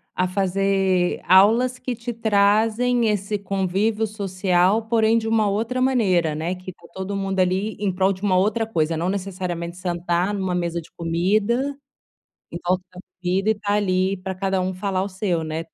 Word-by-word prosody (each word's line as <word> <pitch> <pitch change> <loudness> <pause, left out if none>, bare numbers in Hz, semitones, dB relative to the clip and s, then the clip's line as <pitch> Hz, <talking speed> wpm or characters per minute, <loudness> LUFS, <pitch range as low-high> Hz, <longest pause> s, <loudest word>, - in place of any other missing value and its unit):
a 185 0 +1
fazer 190 -1 +1
aulas 225 +7 +5
que 250 -1 -4
te 235 +1 -5
trazem 220 +3 +2
esse 205 0 -1
convívio 200 +3 0
social, 195 0 +1
porém 225 0 +3
de 225 -1 -2
uma 220 -2 +2
outra 230 +5 -1
maneira, 190 -11 +2
né, 165 +4 -2
que 185 0 -9
está 170 - -20
todo 190 +1 -4
mundo 195 -1 -2
ali 190 +3 +1
em 200 -2 0
prol 190 +1 +2
de 185 - -12
uma 195 -3 +2
outra 215 +4 +1
coisa, 165 -7 0
não 175 +3 -1
necessariamente 180 -3 -4
sentar 175 +1 -1
numa 190 -3 -2
mesa 170 -1 -2
de - - -18
comida, 210 +11 0 0.7
em - - -4
volta 180 +1 +1
da 180 - -11 0.2
comida 190 +4 0
e - - +5
estar 205 -1 -2
ali 190 -1 +1
para 190 +1 -5
cada 190 0 -1
um 185 +1 -2
falar 190 0 -1
o 200 - -4
seu, 185 -3 -1
né? 160 +1 -4
195 Hz, 180 wpm, -22 LUFS, 180-215 Hz, 0.7 s, aulas